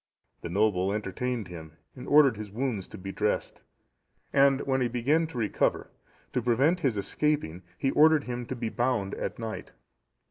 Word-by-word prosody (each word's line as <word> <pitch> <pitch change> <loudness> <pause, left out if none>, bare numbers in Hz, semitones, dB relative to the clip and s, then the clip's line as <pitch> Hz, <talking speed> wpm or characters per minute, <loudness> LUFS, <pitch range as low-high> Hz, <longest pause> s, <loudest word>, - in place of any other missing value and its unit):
The - - -6
noble 95 0 +1
entertained 110 +2 -3
him, 80 -3 -10 0.2
and 125 - -9
ordered 145 -5 +6
his 105 0 -7
wounds 110 -3 -3
to - - -10
be 95 +1 -6
dressed, 105 +1 -2 0.7
and 135 -1 +5
when 135 -1 0
he 125 - +2
began 140 +8 +1
to 155 - -9
recover, 110 -3 0 0.4
to 125 - +1
prevent 135 +9 +2
his 130 -9 0
escaping, 120 - -1 0.2
he 135 - 0
ordered 155 0 +5
him 120 -1 -5
to 130 - -4
be 115 -2 -3
bound 120 -5 -1
at - - -4
night. 110 -2 -6
120 Hz, 170 wpm, -28 LUFS, 105-135 Hz, 0.7 s, ordered